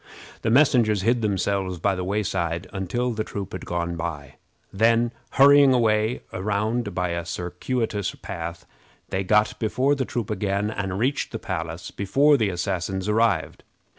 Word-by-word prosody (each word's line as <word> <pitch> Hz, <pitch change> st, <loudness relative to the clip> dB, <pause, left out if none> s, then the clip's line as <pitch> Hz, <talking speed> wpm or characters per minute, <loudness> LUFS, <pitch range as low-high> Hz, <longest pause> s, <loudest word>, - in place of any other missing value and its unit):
The 115 Hz, -, 0 dB
messengers 115 Hz, -6 st, +4 dB
hid 120 Hz, +2 st, +2 dB
themselves 95 Hz, -2 st, -1 dB
by 100 Hz, +3 st, +1 dB
the 90 Hz, -1 st, -3 dB
wayside 90 Hz, -3 st, -1 dB
until 105 Hz, +6 st, -1 dB
the 110 Hz, -1 st, -2 dB
troop 100 Hz, -2 st, -6 dB
had -, -, -7 dB
gone 85 Hz, 0 st, -2 dB
by. 80 Hz, -4 st, -6 dB, 0.4 s
Then 115 Hz, +3 st, +3 dB, 0.2 s
hurrying 140 Hz, -1 st, +7 dB
away 110 Hz, -1 st, +1 dB
round 105 Hz, +3 st, -1 dB
by 90 Hz, -1 st, 0 dB
a 85 Hz, 0 st, -2 dB
circuitous 100 Hz, +5 st, -3 dB
path, 85 Hz, -2 st, -7 dB, 0.4 s
they 95 Hz, +1 st, -1 dB
got 105 Hz, +2 st, +2 dB
before 130 Hz, +6 st, +1 dB
the 135 Hz, -2 st, -1 dB
troop 115 Hz, -4 st, -3 dB
again, 105 Hz, 0 st, -1 dB
and 95 Hz, -3 st, -3 dB
reached 130 Hz, +7 st, 0 dB
the 115 Hz, -, -3 dB
palace 85 Hz, -5 st, -5 dB
before 140 Hz, +9 st, +3 dB
the 110 Hz, -7 st, +1 dB
assassins 90 Hz, +1 st, -2 dB
arrived. 105 Hz, -5 st, +1 dB
100 Hz, 150 wpm, -24 LUFS, 90-115 Hz, 0.4 s, hurrying